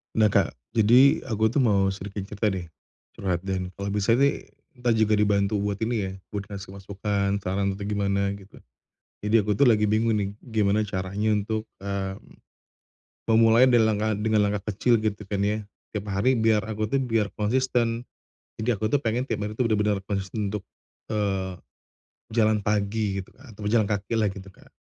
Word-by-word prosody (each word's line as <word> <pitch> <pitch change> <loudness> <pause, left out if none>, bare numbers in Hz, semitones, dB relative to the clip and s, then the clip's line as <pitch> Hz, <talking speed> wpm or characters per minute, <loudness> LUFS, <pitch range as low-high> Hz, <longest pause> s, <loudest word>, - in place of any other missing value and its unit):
Nah, 110 -2 +4
Kak, - - +2 0.2
jadi 120 +6 +5
aku 110 -1 +1
tuh 140 - +1
mau 100 -5 +3
sedikit 100 +1 -6
cerita 105 +2 -2
deh. 95 -4 -2 0.5
Curhat 90 -3 -1
dan 95 -1 -3
kalau 100 0 -4
bisa 105 +2 +2
sih 140 +3 +1 0.3
kita 120 -1 +1
juga 110 -1 +3
dibantu 100 0 +2
buat 100 0 -1
ini 115 +2 0
ya, 95 - -4 0.2
buat 100 -1 -4
kasih 100 -2 -8
masukan, 100 0 -2
saran, 100 +1 -1
atau 100 - -7
gimana 100 -1 0
gitu. 100 +1 -16 0.6
Jadi, 105 +2 +3
aku 105 +1 0
tuh 140 - +4
lagi 105 -2 +4
bingung 110 +2 +2
nih 100 -2 0 0.2
gimana 110 -3 +1
caranya 100 +2 -1
untuk, 110 +1 -2 0.2
mmm, 100 -1 -4 1.1
memulai 115 +2 +6
delengan 110 -3 +3
dengan 110 -1 +2
langkah 105 +1 -2
kecil 120 +3 +3
gitu 105 -1 -2
kan 100 - -1
ya 105 +1 0 0.3
tiap 105 - -2
hari 100 +7 +2
biar 110 -2 +3
aku 110 -1 -3
tuh 135 - +1
biar 115 -5 0
konsisten 120 +1 0 0.6
jadi 115 +2 +1
aku 110 +1 -2
tuh 145 - +3
pengen 120 -2 -1
tiap - - -1
hari 105 - -6
tuh 120 +1 0
bener-bener 105 -2 +1
konsisten 100 +1 -2
untuk, 105 -2 -4 0.5
eee, 95 -3 -1 0.8
jalan 110 -2 +3
pagi 105 -1 0
gitu, 95 - -15
Kak, 130 - -17
atau 105 0 -6
jalan 110 -1 +3
kaki 100 +1 -2
lah 110 -2 +2
gitu, 100 -1 -10
Kak. 95 - -20
105 Hz, 175 wpm, -25 LUFS, 100-110 Hz, 1.1 s, memulai